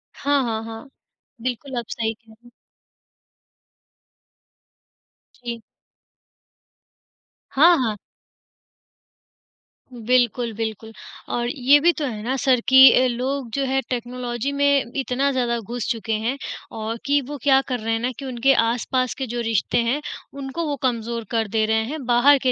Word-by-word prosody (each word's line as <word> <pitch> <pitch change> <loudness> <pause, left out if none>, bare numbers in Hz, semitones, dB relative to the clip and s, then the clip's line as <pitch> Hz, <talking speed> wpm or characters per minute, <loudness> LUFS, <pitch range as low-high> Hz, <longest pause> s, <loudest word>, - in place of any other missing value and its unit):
हाँ, 285 -1 +1
हाँ, 225 -2 -2
हाँ। 225 +4 -9 0.5
बिल्कुल, 255 +2 -4
आप 235 - -6
सही 225 -1 -2
कह 220 0 -21
रहे। 240 - -18 3.0
जी। 235 -1 -4 1.9
हाँ, 335 +6 +6
हाँ। 215 -2 -2 2.0
बिल्कुल, 240 0 +1
बिल्कुल। 220 0 -5 0.4
और 240 0 -1
ये 275 +2 +4
भी 340 +4 +4
तो 300 - -3
है 220 -5 -4
ना 255 +4 -1
सर 260 -2 +3
कि 265 0 +9
अ, - - +3
लोग 255 +1 -2
जो 275 - 0
हैं 270 0 0
टेक्नोलॉजी 245 +1 -3
में 280 -3 +2
इतना 270 +1 0
ज़्यादा 245 -2 0
घुस 230 +1 -5
चुके 225 -1 -3
हैं 230 +5 -1 0.3
औ 220 +1 -4
कि 285 +1 +3
वो 290 0 -6
क्या 270 -2 +5
कर 250 -2 -2
रहे 225 +1 -2
हैं 225 - 0
ना 250 +2 -1
कि 275 - -6
उनके 260 +1 +2
आस-पास 245 +2 0
के 265 - -3
जो 240 +1 -4
रिश्ते 225 -3 0
हैं 255 +6 0 0.4
उनको 275 +5 -4
वो 290 - -1
कमज़ोर 235 -2 -1
कर 225 -2 0
दे 220 +1 +1
रहे 220 0 +1
हैं, 295 +4 -5
बाहर 250 +4 +5
के 255 - +3
245 Hz, 150 wpm, -22 LUFS, 230-270 Hz, 3.0 s, कि